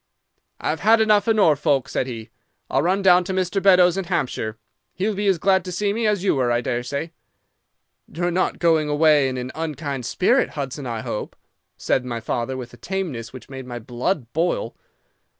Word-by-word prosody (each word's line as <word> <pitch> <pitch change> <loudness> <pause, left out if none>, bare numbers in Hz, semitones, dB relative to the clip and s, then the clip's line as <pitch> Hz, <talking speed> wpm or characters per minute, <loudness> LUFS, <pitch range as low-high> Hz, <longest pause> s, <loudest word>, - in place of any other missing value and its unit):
"'"I've 160 - -2
had 220 +2 +5
enough 215 -1 +3
of 225 - +3
Norfolk," 150 - +3
said 130 - -2
he. 115 -3 -7 0.4
"I'll 135 - +2
run 185 +5 +1
down 180 -1 +6
to 190 - -3
Mr. 185 +1 0
Beddoes 180 -2 +5
in 195 - -2
Hampshire. 125 - -2 0.4
He'll 205 +3 -1
be 205 +1 -2
as 190 -2 +3
glad 190 +2 +2
to 180 - -5
see 200 +3 0
me 225 0 0
as 205 -3 0
you 200 - +3
were, 125 -3 +1
I 120 - +2
daresay." 125 +7 -3 1.0
"'"You're 175 +2 -1
not 185 +2 0
going 160 -3 +2
away 150 -2 +4
in 130 - -4
an 125 +1 -5
unkind 145 -5 -4
spirit, 245 +8 +2
Hudson, 140 -1 -4
I 115 -2 -3
hope," 105 - -5 0.4
said 130 - 0
my 120 -2 -4
father, 120 +3 -3
with 125 -1 -8
a - - -13
tameness 160 - -4
which 130 -3 -11
made 130 -2 -8
my 120 -1 -6
blood 125 - -2
boil. 175 - -1
160 Hz, 190 wpm, -22 LUFS, 130-190 Hz, 1.0 s, down